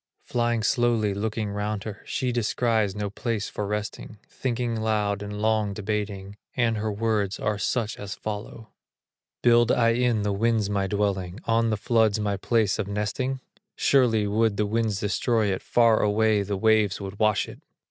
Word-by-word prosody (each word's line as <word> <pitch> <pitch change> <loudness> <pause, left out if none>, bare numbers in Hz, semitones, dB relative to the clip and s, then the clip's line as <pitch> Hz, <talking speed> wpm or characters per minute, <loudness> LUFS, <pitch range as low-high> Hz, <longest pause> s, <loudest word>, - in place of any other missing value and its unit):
Flying 120 -2 0
slowly, 115 -4 +2
looking 105 +1 -2
round 105 0 -3
her, 105 -2 -7
She 130 -2 -1
descries 115 -3 0
no 105 -1 -3
place 110 -1 -3
for 105 - -4
resting, 105 +1 -4
Thinking 120 -2 -2
loud 105 -2 0
and 105 0 -5
long 110 -2 +1
debating, 105 -1 -4 0.2
And 115 -3 +2
her 110 +1 -2
words 105 -2 -1
are 105 -1 -1
such 115 0 -1
as 100 -1 -6
follow: 110 +1 -7 0.7
"Build 120 0 +5
I 115 -1 +3
in 115 -2 +1
the 105 -1 0
winds 110 0 +1
my 100 -1 0
dwelling, 100 -1 -1
On 115 0 +2
the 110 - 0
floods 110 -1 +2
my 105 -1 0
place 110 +1 +1
of 105 - -1
nesting? 105 +6 -2 0.3
Surely 120 -6 +3
would 105 0 +1
the 105 - +1
winds 110 -1 0
destroy 105 0 +1
it, 95 - -4
Far 115 -2 +3
away 105 0 +2
the 100 0 -2
waves 110 -1 +3
would 100 0 -7
wash 110 -1 +2
it." - - -11
105 Hz, 170 wpm, -25 LUFS, 100-115 Hz, 0.7 s, Build